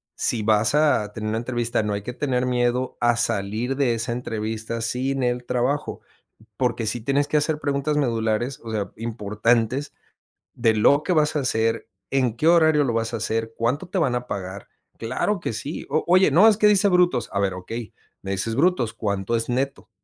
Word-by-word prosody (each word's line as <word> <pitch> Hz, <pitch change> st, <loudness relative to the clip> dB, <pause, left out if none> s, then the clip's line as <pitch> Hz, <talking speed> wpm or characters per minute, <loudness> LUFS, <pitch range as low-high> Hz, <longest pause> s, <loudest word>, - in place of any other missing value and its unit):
si 115 Hz, -3 st, +1 dB
vas 110 Hz, +4 st, +2 dB
a 145 Hz, -9 st, +2 dB
tener 110 Hz, 0 st, -4 dB
una 110 Hz, +1 st, -1 dB
entrevista, 120 Hz, -1 st, -1 dB
no 105 Hz, -1 st, -1 dB
hay 100 Hz, 0 st, -4 dB
que 125 Hz, -, -5 dB
tener 130 Hz, -2 st, -1 dB
miedo 125 Hz, 0 st, 0 dB
a 120 Hz, 0 st, +3 dB
salir 110 Hz, +3 st, -1 dB
de 130 Hz, -4 st, +2 dB
esa 115 Hz, +1 st, -3 dB
entrevista 115 Hz, -1 st, -4 dB
sin 130 Hz, +3 st, -1 dB
el 125 Hz, 0 st, -1 dB
trabajo. 125 Hz, +5 st, -1 dB, 0.6 s
Porque 120 Hz, -3 st, -1 dB
sí 120 Hz, +2 st, 0 dB
tienes 140 Hz, +4 st, +1 dB
que 150 Hz, -, +1 dB
hacer 150 Hz, +1 st, 0 dB
preguntas 145 Hz, 0 st, -1 dB
medulares, 115 Hz, -1 st, -1 dB
o 115 Hz, -, -7 dB
sea, 105 Hz, -3 st, -3 dB
importantes 115 Hz, +4 st, -1 dB, 0.6 s
de 115 Hz, -2 st, +2 dB
lo 140 Hz, +7 st, +4 dB
que 180 Hz, -, 0 dB
vas 155 Hz, -2 st, +2 dB
a -, -, +2 dB
hacer, 115 Hz, -2 st, 0 dB, 0.2 s
en 130 Hz, -4 st, +1 dB
qué 155 Hz, -, +1 dB
horario 160 Hz, -3 st, +5 dB
lo 120 Hz, -, -1 dB
vas 115 Hz, +1 st, -1 dB
a -, -, -1 dB
hacer, 115 Hz, +1 st, -2 dB
cuánto 135 Hz, +10 st, -1 dB
te 190 Hz, -, -3 dB
van 135 Hz, -6 st, +1 dB
a 125 Hz, 0 st, -3 dB
pagar. 95 Hz, -1 st, -6 dB, 0.3 s
Claro 130 Hz, -, -1 dB
que 140 Hz, -, -4 dB
sí. 140 Hz, +8 st, -5 dB
O 155 Hz, +3 st, +1 dB
oye: 185 Hz, -2 st, +5 dB
"No, 185 Hz, +10 st, +6 dB
es 215 Hz, -, +5 dB
que 215 Hz, -, +2 dB
dice 205 Hz, -1 st, +4 dB
brutos". 180 Hz, -9 st, +2 dB
A 100 Hz, -, 0 dB
ver: 100 Hz, -1 st, 0 dB
"Okey, 110 Hz, +5 st, -7 dB, 0.3 s
me 95 Hz, -, -4 dB
dices 100 Hz, +4 st, -1 dB
brutos, 140 Hz, -6 st, +1 dB
¿cuánto 100 Hz, 0 st, -2 dB
es 115 Hz, -, -1 dB
neto?" 135 Hz, +3 st, -2 dB
120 Hz, 200 wpm, -23 LUFS, 110-140 Hz, 0.6 s, No